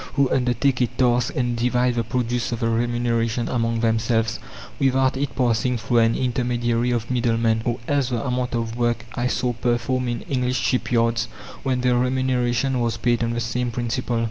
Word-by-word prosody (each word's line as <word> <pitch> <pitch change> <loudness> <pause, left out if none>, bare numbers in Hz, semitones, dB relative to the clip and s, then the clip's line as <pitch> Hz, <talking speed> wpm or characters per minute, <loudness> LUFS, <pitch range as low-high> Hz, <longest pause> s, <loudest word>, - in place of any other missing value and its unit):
who 140 -2 +3
undertake 125 +1 +1
a 125 - +3
task 125 0 +1
and 120 -2 0
divide 125 +1 +1
the 120 -1 0
produce 120 +1 -1
or - - 0
the 115 0 -1
remuneration 115 0 0
among 115 -2 0
themselves 115 0 +1 0.4
without 135 -1 +2
it 140 +2 -3
passing 125 0 +1
through 115 +2 +1
an 115 0 +3
intermediary 120 -1 0
of 120 0 -1
middlemen; 115 -2 +1
or 120 -1 0
else 140 -3 +1
the 120 -1 -2
amount 125 -1 -1
of 115 -1 -2
work 120 -1 0
I 125 -1 -1
saw 125 0 0
performed 120 +1 -1
in 120 -1 -3
English 125 -1 -1
ship 125 - 0
yards 115 -1 +2 0.4
when 130 -2 0
the 125 -1 +2
remuneration 125 0 +1
was 115 -1 0
paid 120 +1 +1
on 115 0 -1
the 120 - -1
same 120 +1 -1
principle. 120 0 -2
120 Hz, 180 wpm, -23 LUFS, 115-125 Hz, 0.4 s, who